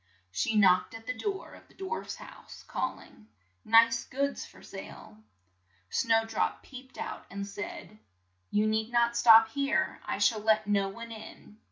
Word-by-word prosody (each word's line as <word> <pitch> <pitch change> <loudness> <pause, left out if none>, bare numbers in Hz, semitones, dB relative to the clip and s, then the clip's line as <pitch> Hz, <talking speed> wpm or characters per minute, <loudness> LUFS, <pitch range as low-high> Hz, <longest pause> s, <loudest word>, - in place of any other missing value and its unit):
She 95 - -1
knocked 185 0 +4
at 225 0 -10
the 250 - -2
door 390 - -4
of - - -15
the - - -23
dwarfs' 385 +5 -5
house, - - -13
call - - -3
ing, 105 - -18 0.4
"Nice 230 +1 +5
goods 280 +2 -2
for - - -17
sale!" - - -10 0.8
Snow 225 -1 +2
drop 225 -1 -2
peeped 260 -1 -12
out - - -6
and 200 +2 -5
said, 205 +1 -8 0.5
"You 210 +1 +2
need 220 +1 0
not 235 0 +2
stop 225 -2 +7
here, 280 +3 -1
I - - -3
shall 225 -3 +3
let 215 0 +3
no 200 -1 +1
one 230 +3 -9
in." 220 -1 -11
225 Hz, 165 wpm, -29 LUFS, 210-235 Hz, 0.8 s, stop